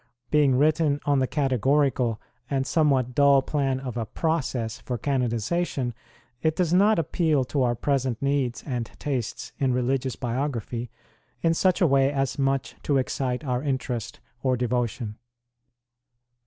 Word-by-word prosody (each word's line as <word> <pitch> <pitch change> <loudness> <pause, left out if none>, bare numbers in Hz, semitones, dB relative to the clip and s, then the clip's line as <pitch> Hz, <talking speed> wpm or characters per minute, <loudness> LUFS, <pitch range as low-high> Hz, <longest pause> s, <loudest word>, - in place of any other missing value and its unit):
Being 145 -4 +4
written 150 0 +2
on 145 -2 +3
the 130 - +1
categorical 135 -3 +1 0.3
and 135 -1 0
somewhat 135 -6 +2
dull 140 0 +5
plan 135 -3 0
of 125 -3 -5
a 115 - -1
process 130 -7 -2
for 125 - -4
canonization, 125 +2 -1 0.5
it 160 0 +1
does 175 -2 +1
not 205 +4 +5
appeal 160 -3 +1
to 135 +2 -1
our 120 -1 +2
present 130 -2 0
needs 140 -3 0
and 125 -5 -3
tastes 130 -6 -3
in 130 -2 +2
religious 130 +1 0
biography 120 -2 -3 0.5
in 165 -1 +4
such 185 +2 +2
a - - +6
way 135 -1 +3
as 135 -1 -1
much 135 -1 0
to 145 - +1
excite 130 0 -1
our 125 -3 -1
interest 130 -5 -3 0.2
or 130 -2 +1
devotion. 120 -3 -2
135 Hz, 140 wpm, -25 LUFS, 125-145 Hz, 0.5 s, a